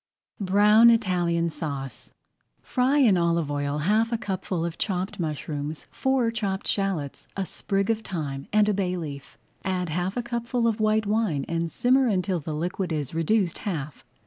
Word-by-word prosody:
BROWN 210 Hz, +4 st, +6 dB
ITALIAN 175 Hz, -7 st, +2 dB
SAUCE 140 Hz, -4 st, -5 dB, 0.5 s
Fry 260 Hz, +3 st, +2 dB
in 230 Hz, -10 st, +5 dB
olive 170 Hz, -3 st, +1 dB
oil 145 Hz, 0 st, -1 dB
half 215 Hz, +9 st, +2 dB
a 230 Hz, -, +1 dB
cupful 185 Hz, -5 st, -3 dB
of 170 Hz, -1 st, -5 dB
chopped 190 Hz, -2 st, -2 dB
mushrooms, 150 Hz, -1 st, -4 dB
four 265 Hz, -4 st, +1 dB
chopped 200 Hz, -4 st, -2 dB
shallots, 190 Hz, -9 st, -2 dB
a 195 Hz, -, -1 dB
sprig 195 Hz, +3 st, -1 dB
of 225 Hz, -1 st, -1 dB
thyme, 145 Hz, -9 st, -5 dB
and 210 Hz, 0 st, +4 dB
a 210 Hz, -, +3 dB
bay 185 Hz, -2 st, -1 dB
leaf. 145 Hz, -5 st, -7 dB, 0.3 s
Add 180 Hz, -2 st, -1 dB
half 180 Hz, +6 st, -2 dB
a 245 Hz, -, -1 dB
cupful 235 Hz, 0 st, -1 dB
of 225 Hz, -1 st, 0 dB
white 215 Hz, 0 st, +2 dB
wine 205 Hz, -9 st, 0 dB
and 165 Hz, 0 st, -2 dB
simmer 260 Hz, +1 st, +3 dB
until 185 Hz, -3 st, 0 dB
the 155 Hz, 0 st, -5 dB
liquid 175 Hz, +3 st, -2 dB
is 150 Hz, -3 st, -2 dB
reduced 170 Hz, +2 st, +1 dB
half. 155 Hz, -7 st, -4 dB
185 Hz, 165 wpm, -26 LUFS, 160-215 Hz, 0.5 s, BROWN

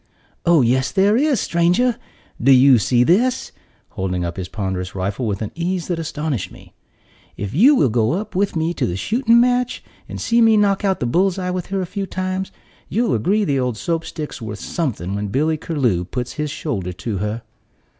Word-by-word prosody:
"Oh, 170 Hz, -5 st, +5 dB
yes 130 Hz, +3 st, +1 dB
there 200 Hz, +2 st, +3 dB
is, 280 Hz, -1 st, +2 dB
stranger! 180 Hz, +10 st, +2 dB, 0.5 s
Do 135 Hz, +4 st, +5 dB
you 130 Hz, -1 st, +7 dB
see 120 Hz, +5 st, +3 dB
this?" 240 Hz, -, +2 dB, 0.4 s
holding 90 Hz, -2 st, -3 dB
up 85 Hz, -, -4 dB
his 95 Hz, -2 st, -5 dB
ponderous 95 Hz, -3 st, -4 dB
rifle 100 Hz, +6 st, -2 dB
with 100 Hz, 0 st, -2 dB
an 105 Hz, -, -5 dB
ease 175 Hz, +1 st, -3 dB
that 175 Hz, -2 st, -1 dB
astonished 150 Hz, -, -3 dB
me. -, -, -16 dB, 0.6 s
"If 100 Hz, 0 st, -5 dB
you 250 Hz, -, +6 dB
will 140 Hz, -, +3 dB
go 120 Hz, -, 0 dB
with 195 Hz, +1 st, 0 dB
me 160 Hz, +1 st, 0 dB
to -, -, -1 dB
the 85 Hz, -, -3 dB
shooting 235 Hz, -, +3 dB
match, 250 Hz, +1 st, +1 dB, 0.3 s
and -, -, -6 dB
see 235 Hz, 0 st, +2 dB
me 225 Hz, -1 st, +5 dB
knock 200 Hz, -1 st, +2 dB
out 195 Hz, -2 st, 0 dB
the -, -, +1 dB
bull's 180 Hz, +9 st, +1 dB
eye 180 Hz, -1 st, -2 dB
with 180 Hz, -1 st, -4 dB
her 195 Hz, 0 st, -2 dB
a -, -, -2 dB
few 195 Hz, +2 st, -4 dB
times, 185 Hz, +1 st, -3 dB, 0.4 s
you'll 235 Hz, +2 st, +1 dB
agree 195 Hz, -, +1 dB
the 140 Hz, -5 st, 0 dB
old 125 Hz, -3 st, -1 dB
Soap 165 Hz, +6 st, -2 dB
stick's 150 Hz, -6 st, -7 dB
worth 110 Hz, -2 st, -6 dB
something 110 Hz, -, -3 dB
when 100 Hz, +1 st, -2 dB
Billy 150 Hz, +10 st, +1 dB
Curlew 130 Hz, -, 0 dB
puts 125 Hz, +5 st, -4 dB
his 150 Hz, 0 st, -3 dB
shoulder 100 Hz, -, -4 dB
to 95 Hz, +3 st, -4 dB
her." 105 Hz, +3 st, -3 dB
155 Hz, 195 wpm, -20 LUFS, -, 0.6 s, you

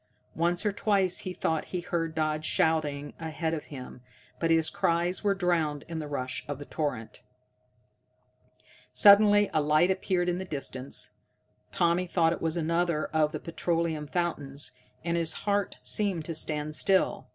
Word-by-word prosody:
Once 175 Hz, +4 st, 0 dB
or 210 Hz, -, +3 dB
twice 195 Hz, -3 st, +1 dB
he 185 Hz, -, -5 dB
thought 160 Hz, -3 st, -1 dB
he 180 Hz, -, -4 dB
heard 165 Hz, -2 st, -2 dB
Dodd 155 Hz, -1 st, 0 dB
shouting 150 Hz, -3 st, 0 dB
ahead 160 Hz, 0 st, -3 dB
of 155 Hz, -, -4 dB
him, 130 Hz, -3 st, -9 dB, 0.4 s
but 165 Hz, -, 0 dB
his 165 Hz, -1 st, +4 dB
cries 170 Hz, +4 st, 0 dB
were 200 Hz, -1 st, +2 dB
drowned 165 Hz, -6 st, 0 dB
in 165 Hz, -1 st, -4 dB
the 150 Hz, -, -5 dB
rush 130 Hz, -3 st, -3 dB
of 145 Hz, -2 st, -4 dB
the 145 Hz, -, -9 dB
torrent. 145 Hz, -9 st, -4 dB, 1.7 s
Suddenly 205 Hz, 0 st, +6 dB
a 155 Hz, -, +3 dB
light 155 Hz, +5 st, +3 dB
appeared 185 Hz, -1 st, 0 dB
in 175 Hz, 0 st, 0 dB
the -, -, -3 dB
distance. 135 Hz, -5 st, -4 dB, 0.6 s
Tommy 175 Hz, +1 st, +1 dB
thought 165 Hz, -2 st, +2 dB
it -, -, -7 dB
was 165 Hz, +1 st, -1 dB
another 170 Hz, -1 st, 0 dB
of 155 Hz, -1 st, +2 dB
the -, -, -4 dB
petroleum 165 Hz, -2 st, -2 dB
fountains, 145 Hz, -5 st, -3 dB, 0.3 s
and 170 Hz, 0 st, 0 dB
his 165 Hz, -1 st, +1 dB
heart 200 Hz, -1 st, 0 dB
seemed 195 Hz, -7 st, +1 dB
to 165 Hz, -, -4 dB
stand 155 Hz, -1 st, -1 dB
still. 195 Hz, +2 st, +1 dB
165 Hz, 160 wpm, -28 LUFS, 155-180 Hz, 1.7 s, Suddenly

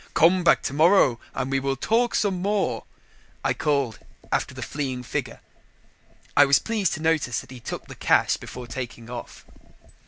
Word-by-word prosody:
"Come 175 Hz, +3 st, +5 dB
back 170 Hz, -, +4 dB
tomorrow 150 Hz, -4 st, +4 dB, 0.2 s
and 135 Hz, 0 st, -2 dB
we 135 Hz, -, +2 dB
will 135 Hz, 0 st, -1 dB
talk 230 Hz, -, +1 dB
some 190 Hz, -4 st, +1 dB
more," 200 Hz, 0 st, 0 dB, 0.6 s
I -, -, +3 dB
called 140 Hz, -7 st, 0 dB, 0.3 s
after -, -, -1 dB
the -, -, -5 dB
fleeing 130 Hz, -4 st, -4 dB
figure. -, -, -4 dB, 0.9 s
I 145 Hz, -, +8 dB
was 140 Hz, 0 st, +5 dB
pleased 215 Hz, -6 st, 0 dB
to 160 Hz, -, -7 dB
notice 160 Hz, -7 st, +1 dB
that -, -, -16 dB
he 130 Hz, -, -9 dB
took 115 Hz, -, -6 dB
the -, -, -10 dB
cash -, -, +3 dB
before 125 Hz, -1 st, -9 dB
taking 120 Hz, -2 st, -7 dB
off. 120 Hz, -1 st, -8 dB
140 Hz, 165 wpm, -25 LUFS, 125-180 Hz, 0.9 s, I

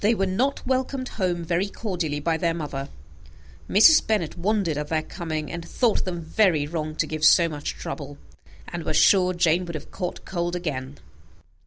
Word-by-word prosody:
They 220 Hz, +3 st, +4 dB
were 195 Hz, -, +1 dB
not 245 Hz, +10 st, -1 dB
welcomed 260 Hz, 0 st, -1 dB
home 180 Hz, -4 st, -2 dB
very 175 Hz, +4 st, 0 dB
cordially 175 Hz, -8 st, -3 dB
by 160 Hz, +2 st, 0 dB
their 170 Hz, -1 st, 0 dB
mother. 145 Hz, -3 st, -5 dB, 0.8 s
Mrs. 220 Hz, +11 st, +6 dB
Bennet 210 Hz, -8 st, 0 dB
wondered 190 Hz, -2 st, 0 dB
at 150 Hz, 0 st, -3 dB
their 155 Hz, 0 st, 0 dB
coming, 155 Hz, -2 st, -5 dB
and 170 Hz, -1 st, -5 dB
thought 225 Hz, +6 st, 0 dB
them 175 Hz, -2 st, -4 dB
very 165 Hz, -2 st, +2 dB
wrong 155 Hz, 0 st, -4 dB
to -, -, 0 dB
give 155 Hz, -1 st, -5 dB
so 170 Hz, +1 st, +6 dB
much 150 Hz, -2 st, -5 dB
trouble, 70 Hz, -, -7 dB, 0.5 s
and 175 Hz, -, -5 dB
was 155 Hz, -1 st, 0 dB
sure 185 Hz, -2 st, +5 dB
Jane 175 Hz, +1 st, +2 dB
would 170 Hz, -1 st, -6 dB
have 155 Hz, -, -8 dB
caught 180 Hz, -2 st, -5 dB
cold 175 Hz, -1 st, -2 dB
again. 145 Hz, -6 st, -4 dB
170 Hz, 180 wpm, -24 LUFS, 155-195 Hz, 0.8 s, Mrs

